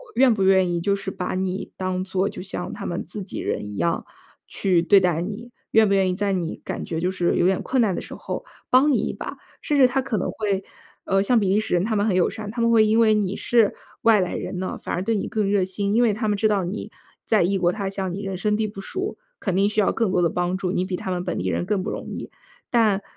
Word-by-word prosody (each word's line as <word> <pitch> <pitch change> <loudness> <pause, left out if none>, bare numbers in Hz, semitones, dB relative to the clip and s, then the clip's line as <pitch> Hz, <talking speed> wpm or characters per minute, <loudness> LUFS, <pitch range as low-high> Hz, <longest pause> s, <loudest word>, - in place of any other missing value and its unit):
愿 250 -1 +5
不 205 - -2
愿 190 -2 +4
意 170 - 0
就 200 +3 +1
是 195 -1 -5
把 180 0 -3
你 190 +1 -3
当 185 -1 -2
做 190 +1 0
就 - - -8
像 180 -1 -5
他 - - -7
们 175 - -3
自 200 +4 -6
己 185 - -6
人 - - -2
一 105 - -7
样 170 +10 0 0.4
去 185 -4 +1
对 195 +4 +6
待 175 -3 +1
你？ 215 +6 -6 0.2
愿 220 -1 +5
不 200 - +2
愿 190 -1 +3
意 180 - -1
在 200 +1 0
你 175 -4 -2
感 - - -4
觉 160 -1 -3
就 180 +2 0
是 175 -2 0
有 - - +2
点 190 0 +2
困 260 - 0
难 210 -5 +2
的 - - -3
时 - - -8
候 - - -5 0.2
帮 265 +4 +5
你 265 - +3
一 - - -2
把？ - - -7 0.2
甚 295 - 0
至 265 - +7
他 265 +2 0
可 255 -4 -2
能 185 - -1
会， 200 -3 -1 0.4
呃， 195 0 +2
像 235 +4 +3
比 195 -3 +1
利 205 +2 +3
时 215 - -2
人 175 +1 +3
他 220 0 0
们 205 - +2
很 190 - +1
友 185 - +3
善， 215 -2 -6
他 235 +1 -3
们 230 0 +3
会 220 -1 +6
因 220 +2 +3
为 220 -1 +5
你 205 -2 0
是 230 -4 +2 0.3
外 220 -4 +5
来 180 - -2
人 180 - -4
呢， 185 - -3
反 - - -3
而 180 - -2
对 225 +3 0
你 200 - -2
更 210 -3 0
热 200 -2 +3
心。 200 +2 -1
因 230 - +4
为 230 -3 +4
他 215 +2 -2
们 205 - +1
知 215 - +3
道 205 -3 +1
你 190 +5 -4 0.4
在 215 -5 +3
异 195 +3 +1
国 175 0 +3
他 200 -1 -3
乡， 195 -2 -3
你 200 - -4
人 195 -1 -3
生 210 +3 0
地 220 - 0
不 205 -1 -8
熟， 380 - -4 0.2
肯 190 -4 -1
定 200 +2 +3
需 215 - -1
要 205 - +3
更 225 -5 0
多 180 -1 +2
的 170 - +3
帮 180 +1 -1
助， 185 -2 -2
你 180 - 0
比 185 -1 -3
他 185 - -4
们 180 0 -2
本 180 - -3
地 - - -1
人 - - -1
更 200 -2 0
不 - - -3
容 - - -6
易。 - - -6 0.4
但 215 -5 +3
195 Hz, 305 characters per minute, -23 LUFS, 185-215 Hz, 0.4 s, 至